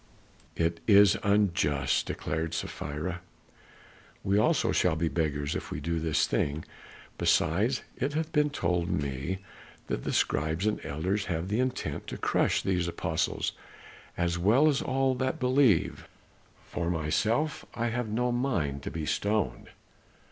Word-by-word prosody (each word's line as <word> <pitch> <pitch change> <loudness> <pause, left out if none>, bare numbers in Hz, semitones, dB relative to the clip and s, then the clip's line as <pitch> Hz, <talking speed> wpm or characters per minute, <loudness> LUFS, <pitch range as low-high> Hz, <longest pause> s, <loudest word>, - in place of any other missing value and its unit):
"It 85 0 0
is 100 -1 +7
unjust," 85 - +2
declared 80 +1 -3
Sapphira, 80 +4 -4 1.0
"we 95 - +1
also - - +2
shall 80 - +2
be 80 +1 0
beggars 75 -4 -1
if - - -4
we - - -4
do 85 +2 -1
this 80 -2 +2
thing, 75 +2 -1 0.5
besides - - +2
it 140 +3 -1
hath 160 +1 -2
been 150 -1 +3
told 90 -9 -1
me 70 +5 -2 0.5
that - - -3
the - - -2
scribes 80 +6 0
and 110 - 0
elders 90 +8 -1
have 85 0 -2
the 105 +3 0
intent 130 0 -2
to - - -5
crush - - +1
these 90 -2 0
apostles 85 - -1 0.7
as 85 0 0
well 115 - +5
as 140 -3 +2
all 135 0 +1
that 130 +1 -1
believe; 125 -7 +2 0.6
for 85 -1 -3
myself 105 - 0
I 120 0 0
have 120 -1 -2
no 120 +3 0
mind 95 - -1
to - - -5
be 80 +2 -4
stoned." 105 +6 -1
90 Hz, 140 wpm, -29 LUFS, 80-120 Hz, 1.0 s, is